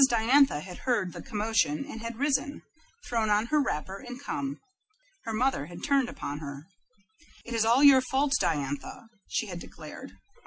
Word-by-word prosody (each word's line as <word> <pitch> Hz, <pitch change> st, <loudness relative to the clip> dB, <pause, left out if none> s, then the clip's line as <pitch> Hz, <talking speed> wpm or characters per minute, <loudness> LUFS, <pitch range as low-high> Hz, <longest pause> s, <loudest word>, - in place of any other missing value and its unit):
Diantha 240 Hz, -, +4 dB
had 180 Hz, +1 st, -9 dB
heard 210 Hz, -8 st, 0 dB
the -, -, -7 dB
commotion, 210 Hz, -, 0 dB
and 225 Hz, -, -8 dB
had 230 Hz, 0 st, -5 dB
risen, 280 Hz, +1 st, 0 dB, 0.4 s
thrown 225 Hz, -3 st, 0 dB
on 210 Hz, +1 st, +3 dB
her 300 Hz, -, +5 dB
wrapper, 190 Hz, -, -3 dB
and 250 Hz, -1 st, -8 dB
come. 280 Hz, -1 st, -4 dB, 0.7 s
Her 225 Hz, -, -3 dB
mother 220 Hz, -, 0 dB
had 170 Hz, 0 st, -10 dB
turned 275 Hz, -3 st, +2 dB
upon 145 Hz, -9 st, -5 dB
her. 140 Hz, -1 st, -8 dB, 0.8 s
"It 235 Hz, -, -6 dB
is 225 Hz, -1 st, +2 dB
all 240 Hz, +5 st, +4 dB
your 275 Hz, -2 st, +8 dB
fault, 270 Hz, +2 st, +1 dB
Diantha," 150 Hz, -, -2 dB, 0.2 s
she -, -, -1 dB
had 180 Hz, -4 st, -6 dB
declared. -, -, -10 dB
230 Hz, 165 wpm, -28 LUFS, 185-265 Hz, 0.8 s, your